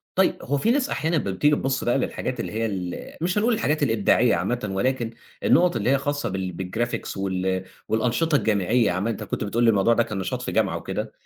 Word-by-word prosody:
طيّب، 190 0 +3
هو 145 - -1
في 220 +11 +2
ناس 275 +2 +1
أحيانًا 160 +2 0
لمّا 100 -11 0
بتيجي 145 +10 +3
بتبُص 135 -1 -1
بقى 120 +2 +2
للحاجات 130 -1 -3
اللي - - -3
هي 115 +1 -1
ال 95 -5 -5
مش 180 +4 0
هنقول 230 +3 +3
الحاجات 155 -9 0
الإبداعية 115 0 +3
عامةً 120 -4 -2
ولكن 120 +4 0 0.3
النقط 175 -3 +4
اللي 110 +1 0
هي 140 - +4
خاصة 145 +1 -2
بال 95 -1 -3
بالGraphics 110 +4 -3
وال 95 -1 -1 0.2
والأنشطة 125 +8 +1
الجامعية 110 -1 +2
عامةً، 95 +5 -1
أنت 115 - -3
كُنت - - -3
بتقول 115 +4 0
لي 115 - +6
الموضوع 105 +2 +4
ده 115 - +3
كان 105 -3 -5
نشاط 95 - -3
في - - -4
جامعة - - +1
وكده، - - -4
120 Hz, 215 wpm, -24 LUFS, 100-145 Hz, 0.3 s, لي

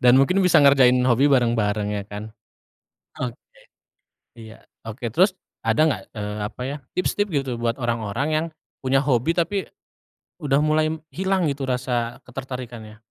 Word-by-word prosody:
dan 125 +1 +7
mungkin 180 +8 +3
bisa 180 -3 +5
ngerjain 135 -3 +6
hobi 130 +4 +4
bareng-bareng 110 -5 +2
ya 100 - -2
kan? 105 +1 -7 0.9
Oke. 125 -1 -3 1.0
Iya. 110 -1 -13 0.2
Oke. 115 0 -5
Terus 185 - +3 0.2
ada 110 +2 +1
nggak, 160 - 0
eee, 105 0 -4
apa 125 - -9
ya, 140 +3 -3 0.2
tips-tips 205 +3 0
gitu 140 -5 -1
buat 115 -1 0
orang-orang 120 +1 -2
yang, 155 +1 +1 0.3
punya 135 +1 +1
hobi, 135 +4 +1
tapi, 185 +3 0 0.7
udah 140 -3 +2
mulai 155 0 +2
m 160 0 -5
hilang 190 0 0
gitu 135 -1 -5
rasa 125 -2 -1
ketertarikannya? 120 -4 -8
130 Hz, 145 wpm, -23 LUFS, 115-155 Hz, 1.0 s, dan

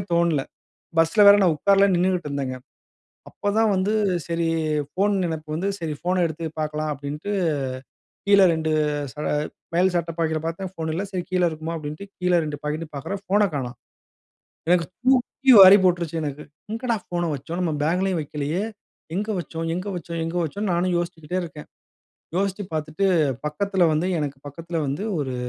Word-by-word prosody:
தோணல. 170 -5 +2 0.6
பஸ்ல 165 +6 +4
வேற 200 - +10
நா - - +5
உக்காரல 200 +4 +4
நின்னுட்டு 180 -2 +1
இருந்தேங்க. 135 -2 -3 0.8
அப்ப 205 - -2
தான் 225 -1 +4
வந்து 195 +3 +1 0.4
சரி, 170 0 0 0.5
ஃபோன் 200 +2 +1
நினப்பு 160 -2 -4
வந்து, 175 +5 -2
"சரி. 155 -2 -3
ஃபோன 180 +1 +1
எடுத்து 165 +1 -6 0.2
பார்க்கலாம்" 155 0 -2
அப்படின்ட்டு 145 +8 -5 1.0
கீழ 200 -1 +6
2 160 -1 -1 0.4
ச - - -38 0.6
மேல் 185 +2 +3
சட்ட 170 -1 0
பாக்கெட்டில 160 -1 0
பார்த்தேன், 180 +3 -4
ஃபோன் 160 -2 -4
இல்ல. 185 +4 -2
"சரி, 180 -2 -2
கீழ 185 - +1
இருக்குமா?" 160 +1 -5
அப்படின்ட்டு, 155 +5 -6
கீழ 180 0 +1
2 150 -1 -4
பாக்கெட்டும் 155 +2 -4
பார்க்குறேன் 195 +8 -4
ஃபோன 205 +2 +3
காணோம்! 130 -3 -3 0.9
எனக்கு 175 -1 +4 0.2
தூக்கி 265 +1 +3
வாரி 195 +1 +11
போட்டுருச்சு, 170 -3 +1
எனக்கு. 145 0 -4 0.3
"எங்கடா 230 +1 -1
ஃபோன 175 -1 -2
வச்சோம்? 160 +6 -6
நம்ம 170 -3 0
பேக்லேயும் 180 +2 +1
வைக்கலையே 150 +5 -3 0.5
எங்க 210 +3 -2
வச்சோம்? 165 -1 -5
எங்க 185 +3 -4
வச்சோம்?" 170 -1 -5
எங்க 165 +1 -4
வச்சோம்னு, 200 +6 -3
நானு 175 +1 +1
யோசிச்சுகிட்டே 175 0 -4
இருக்கேன். 150 -2 -9 0.7
யோசிச்சு 195 +1 -1
பார்த்துட்டு, 155 +5 -1 0.4
பக்கத்தில 190 +3 +1
வந்து 155 +4 +1
எனக்கு 140 -2 -3
பக்கத்தில 165 +4 -6
வந்து 140 +10 -2 0.2
ஒரு 130 -2 -3
170 Hz, 155 wpm, -23 LUFS, 155-190 Hz, 1.0 s, வாரி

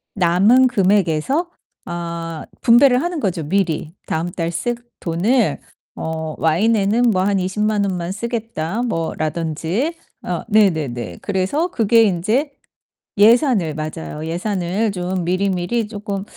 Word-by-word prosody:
남은 200 +8 +4
금액에서 200 - +1 0.4
아 170 -1 -5 0.2
분배를 250 +2 +5
하는 345 -2 -2
거죠 185 - -1
미리. 165 -4 -1
다음 165 +2 -1
달 170 0 -3
쓸 240 +8 -2 0.3
돈을 205 +8 +1 0.4
어 160 -1 -4
'와인에는 210 +7 +2
뭐 185 -2 +1
한 200 -1 +1
200,000 210 +3 0
원만 180 -2 -3
쓰겠다.' 225 -3 -3
뭐 165 -9 -2
라든지 165 - -2 0.3
어 175 -2 -2
네네네. 150 - +1
그래서 200 - 0
그게 225 0 +4
인제 215 - +1 0.7
예산을 220 - +4
맞아요. 155 0 -5
예산을 185 +4 -1
좀 180 -1 -3
미리미리 190 +4 0
쪼끔 205 -2 -5
190 Hz, 240 characters per minute, -19 LUFS, 170-225 Hz, 0.7 s, 분배를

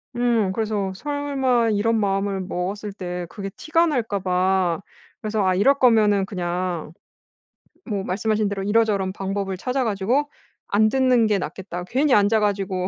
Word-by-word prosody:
음 235 -5 +1
그래서 210 -2 -1
설마 270 -2 0
이런 220 +2 +1
마음을 195 -1 0
먹었을 195 +3 -4
때 180 -2 -5
그게 195 0 -6
티가 330 +2 +2
날까 230 -9 -1
봐. 185 -1 +1 0.4
그래서 215 -1 -1
'아 185 -1 +2
이럴 275 +9 +3
거면은 210 -5 +4
그냥' 175 -4 -3 1.0
뭐 200 -3 -2
말씀하신 210 +2 0
대로 200 -1 -3
'이런저런 205 -2 +1
방법을 195 0 -3
찾아 255 +6 -1
가지고 230 +8 0 0.4
안 215 +2 +3
듣는 255 -2 +3
게 210 -1 +2
낫겠다. 180 +1 -6
괜히 265 +7 +1
앉아 210 +1 +4
가지고 195 -3 -1
205 Hz, 310 characters per minute, -23 LUFS, 190-230 Hz, 1.0 s, 거면은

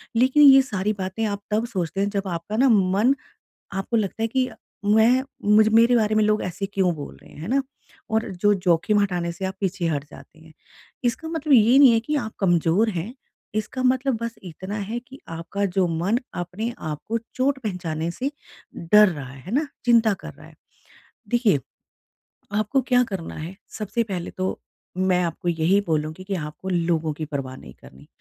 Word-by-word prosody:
लेकिन 260 +5 +5
ये 270 -1 +9
सारी 210 -5 -2
बातें 190 +2 -4
आप 200 -1 -2
तब 215 +2 +1
सोचते 190 -4 -3
हैं 200 - +1
जब 200 -1 -3
आपका 175 +4 -4
ना 265 +3 +5
मन 205 +3 +4 0.6
आपको 195 +4 -1
लगता 215 +1 -1
है - - +3
कि 255 +2 0 0.4
मैं 220 +5 +4 0.3
मुझ 215 +1 +6
मेरे 235 +2 +6
बारे 215 -1 +2
में 215 - +3
लोग 215 0 +2
ऐसे 185 +2 -3
क्यों 185 -2 +2
बोल 145 - -8
रहे - - -17
हैं, - - -13
है 170 - -5
ना? 275 +2 +2 0.5
और 220 +1 +1 0.2
जो 205 0 +5
जोखिम 185 +3 +2
हटाने 175 -4 -1
से 190 +3 -7
आप 190 0 -2
पीछे 190 -2 -1
हट 145 -3 -1
जाते - - -15
हैं। 160 0 -17 0.5
इसका 245 +7 -1
मतलब 320 -2 -1
ये 235 +2 +6
नहीं 275 -4 +8
है 225 - +3
कि 300 +6 -2
आप 235 -6 -3
कमज़ोर 175 +3 +3
हैं 190 +5 -4 0.4
इसका 215 +4 -2
मतलब 260 0 +2
बस 230 0 -3
इतना 185 +4 -6
है 215 +3 -3
कि 270 +2 -13
आपका 170 +5 -3
जो 185 -2 +4
मन 175 +8 0 0.2
अपने 190 +7 -4
आप 150 -2 -4
को 230 - 0 0.2
चोट 265 +1 +1
पहचाने 170 -5 -3
से 260 +10 -3 0.5
डर 210 +5 +5
रहा 145 -6 -5
है 135 0 -12
है 195 - -6
ना? 300 +3 +2 0.2
चिंता 230 -3 +4
कर - - -8
रहा - - -15
है। - - -16 0.7
देखिए, 230 - +2 0.9
आपको 215 +6 +1
क्या 250 0 +3
करना 195 -8 -6
है 165 +4 -7 0.2
सबसे 220 +2 -1
पहले 185 -5 -5
तो 185 0 -2 0.4
मैं 185 -1 +2
आपको 170 +1 -4
यही 170 +4 +2
बोलूँगी 155 +3 -2
कि 195 0 -2
आपको 150 +3 -6
लोगों 165 -3 0
की 155 +1 -5
परवाह 135 -3 -5
नहीं 65 - -12
करनी। 65 +1 -16
200 Hz, 195 wpm, -23 LUFS, 170-230 Hz, 0.9 s, ये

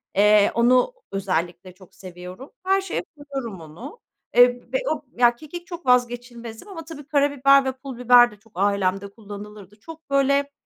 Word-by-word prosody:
Eee, 210 0 +5
onu 250 - +3 0.2
özellikle 185 -2 -3
çok 185 -1 -19
seviyorum. 180 +7 -11
Her 385 +1 +2
şeye 385 - -4
koyuyorum 270 - -7
onu. 205 - -11 0.4
Eee, 245 0 +4
ve - - +3
o 315 - -2 0.2
ya, 240 -1 +4
kekik 345 +6 -10
çok 345 -3 -9
vazgeçilmezim 245 - -1
ama 330 -5 -9
tabii, 300 -3 -10
karabiber 280 -2 +3
ve 265 - 0
pul 260 -1 -10
biber 245 -1 +6
de - - -14
çok 225 0 -26
ailemde 195 0 0
kullanılırdı. 210 -1 -11
Çok 320 +3 -13
böyle, 280 +1 +2
245 Hz, 160 wpm, -23 LUFS, 200-280 Hz, 0.4 s, biber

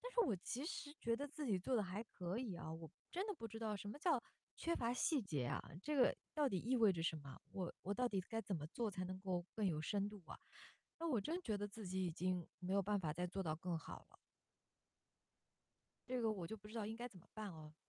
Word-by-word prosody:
但 - - -3
是 480 - +5
我 330 - +5
其 250 - -2
实 345 -5 -3
觉 230 0 +3
得 285 +4 -2
自 295 0 -3
己 205 -5 +4
做 245 +7 +2
得 215 - +4
还 195 +3 -2
可 185 -1 -3
以 220 -9 -2
啊， 160 - -4
我 160 -2 -6 0.2
真 370 +3 +1
的 425 - 0
不 230 - -5
知 225 - -7
道 215 -2 0
什 205 - -5
么 210 - -4
叫 310 -6 +4 0.4
缺 335 0 +1
乏 235 0 +2
细 275 +1 +3
节 150 -10 0
啊？ - - 0 0.2
这 300 +6 0
个 260 - +7 0.2
到 300 -3 +4
底 190 -7 +1
意 250 +7 +2
味 220 -4 +7
着 165 - -2
什 160 -1 +2
么？ 140 -3 -8
我 185 -3 -1
我 200 +2 0
到 250 +2 +3
底 195 -4 +2
该 225 +5 -2
怎 200 - -1
么 150 -2 -3
做 220 +6 0
才 185 -1 -2
能 185 +1 -3
够 180 -2 0
更 215 - +1
有 160 -5 +3
深 200 +5 +2
度 210 -1 -8
啊， - - -6 0.6
那 335 0 0
我 245 -8 +4
真 330 - 0
觉 220 - +1
得 205 0 -1
自 205 0 -6
己 185 +1 +1
已 175 - +2
经 180 0 +1
没 185 +1 -1
有 200 - +5
办 205 0 +2
法 155 -3 +1
再 180 +3 0
做 190 +1 -1
到 155 -1 +2
更 170 0 -1
好 - - -7
了。 - - -17 1.9
这 250 -1 +1
个 225 - +4
我 185 -6 -2
就 220 - -3
不 210 0 -11
知 - - -9
道 225 -3 0
应 220 - -2
该 240 +1 -3
怎 215 -7 -8
么 - - -19
办 215 -2 -3
啊。 155 -1 -9
205 Hz, 290 characters per minute, -43 LUFS, 180-245 Hz, 1.9 s, 个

